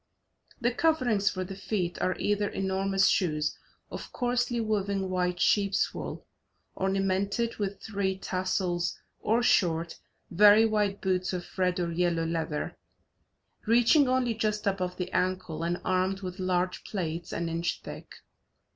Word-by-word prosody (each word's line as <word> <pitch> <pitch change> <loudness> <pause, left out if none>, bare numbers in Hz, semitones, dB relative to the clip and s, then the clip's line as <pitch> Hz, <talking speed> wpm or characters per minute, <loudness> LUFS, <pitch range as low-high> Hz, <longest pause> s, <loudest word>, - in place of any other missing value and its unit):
The 240 +1 +1
coverings 245 -10 +2
for 185 -1 -3
the 190 +1 -7
feet 190 -3 -2
are 185 - 0
either 205 0 0
enormous 195 0 +1
shoes 150 -4 +1 0.4
of - - -7
coarsely 245 -1 0
woven 200 -3 -1
white 180 -1 0
sheeps' 200 0 +2
wool, - - -6 0.5
ornamented 195 +4 0
with 200 -1 -3
three 195 -3 -1
tassels, 185 -2 -1 0.2
or 230 +3 +1
short, 165 -6 +2 0.3
very 210 +4 +7
wide 210 -2 0
boots 185 -1 0
of 180 -1 -3
red 180 -1 +1
or 170 -1 -1
yellow 170 -1 +1
leather, 160 -2 -2 0.9
reaching 240 +5 +5
only 255 -2 +2
just 215 -1 -1
above 185 -2 -1
the 180 0 -4
ankle 180 -3 -1
and 170 +1 -1
armed 185 +1 +1
with 185 0 -6
large 180 0 0
plates 170 -4 -4
an 170 0 -2
inch 165 +1 -2
thick. - - -9
190 Hz, 140 wpm, -28 LUFS, 180-210 Hz, 0.9 s, very